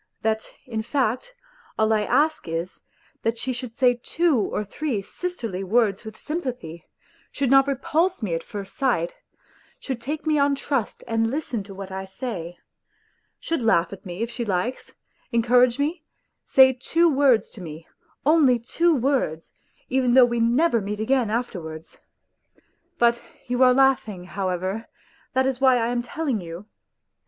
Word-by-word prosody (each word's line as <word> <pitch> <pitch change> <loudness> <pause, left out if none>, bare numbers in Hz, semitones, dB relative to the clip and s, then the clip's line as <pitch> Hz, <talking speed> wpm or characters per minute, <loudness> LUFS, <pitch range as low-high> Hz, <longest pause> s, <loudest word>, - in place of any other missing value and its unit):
That, 220 0 +1 0.2
in 225 -3 -3
fact, 260 - -1 0.4
all 220 0 +3
I 215 - +2
ask 295 - +1
is, 165 +2 -4 0.4
that 225 +1 -1
she 255 +3 -2
should 245 -1 -6
say 245 +1 +2
two 335 +1 +1
or 210 0 -2
three 230 -1 -3
sisterly 230 - -4
words 210 0 +1
with 220 -1 -9
sympathy, 250 - -5 0.4
should 270 -2 -1
not 270 0 +6
repulse 310 +4 0
me 185 -5 -1
at 165 - -1
first 195 +2 -8
sight; 235 -11 0 0.7
should 260 -4 -5
take 300 +6 -4
me 305 -1 +2
on 280 0 +3
trust 275 -4 -2
and 225 0 +1
listen 260 -4 -2
to 195 -1 -10
what 195 0 -8
I 190 0 -5
say; 190 -5 -6 0.8
should 330 -5 -2
laugh 200 -6 +2
at 195 - -10
me 185 +2 -4
if 235 - -4
she 235 0 -3
likes, 205 +4 -3 0.4
encourage 245 +1 +4
me, 305 +3 -1 0.4
say 260 -1 +6
two 330 +7 +2
words 270 -6 +3
to 205 - -11
me, 160 -1 -9 0.4
only 290 -5 +5
two 330 +8 +1
words, 250 - -1 0.3
even 255 -1 +2
though 260 -1 +9
we 235 -1 -1
never 235 +2 +3
meet 205 +1 -4
again 245 0 +1
afterwards!... 175 -9 -5 1.0
But 235 0 +3 0.2
you 245 +1 -1
are 255 -1 +7
laughing; 250 -8 +2
however, 190 +3 -3 0.5
that 260 0 +2
is 265 -1 -1
why 260 -2 +5
I 230 0 0
am 245 0 0
telling 255 -2 -2
you. 170 +3 -8
240 Hz, 160 wpm, -24 LUFS, 205-270 Hz, 1.0 s, though